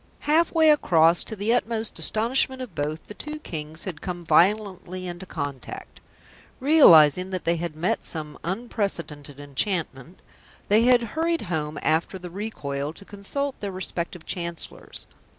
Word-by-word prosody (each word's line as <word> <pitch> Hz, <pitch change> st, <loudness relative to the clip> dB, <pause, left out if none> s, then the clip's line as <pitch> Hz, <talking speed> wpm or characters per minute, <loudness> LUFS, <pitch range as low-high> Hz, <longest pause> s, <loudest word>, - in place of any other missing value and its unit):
Half 320 Hz, +3 st, +3 dB
way 320 Hz, -2 st, +5 dB
across, 170 Hz, -, +4 dB
to 220 Hz, -, -6 dB
the 210 Hz, +3 st, 0 dB
utmost 230 Hz, -2 st, -1 dB
astonishment 260 Hz, +4 st, +2 dB
of 250 Hz, -7 st, -7 dB
both, 150 Hz, +2 st, -3 dB
the -, -, -10 dB
two 300 Hz, +7 st, -6 dB
Kings 155 Hz, -, -7 dB
had 170 Hz, -6 st, -6 dB
come 175 Hz, -2 st, -5 dB
violently 185 Hz, +2 st, +2 dB
into 175 Hz, +1 st, -7 dB
contact. 145 Hz, -6 st, -6 dB, 0.6 s
Realising 180 Hz, -, +6 dB
that 185 Hz, -2 st, -4 dB
they 170 Hz, 0 st, +2 dB
had 170 Hz, -2 st, -4 dB
met 170 Hz, +4 st, -1 dB
some 150 Hz, -2 st, -5 dB
unprecedented 175 Hz, -, -4 dB
enchantment, 145 Hz, +1 st, -3 dB, 0.5 s
they 215 Hz, +3 st, +5 dB
had 245 Hz, -1 st, +5 dB
hurried 330 Hz, +1 st, 0 dB
home 150 Hz, -1 st, -2 dB
after 160 Hz, +4 st, +1 dB
the 180 Hz, -1 st, -9 dB
recoil 150 Hz, -8 st, -4 dB
to 200 Hz, -, -14 dB
consult 265 Hz, +9 st, -3 dB
their 200 Hz, -1 st, -4 dB
respective 180 Hz, -2 st, -4 dB
Chancellors. 170 Hz, -2 st, -4 dB
185 Hz, 145 wpm, -25 LUFS, 160-220 Hz, 0.6 s, Realising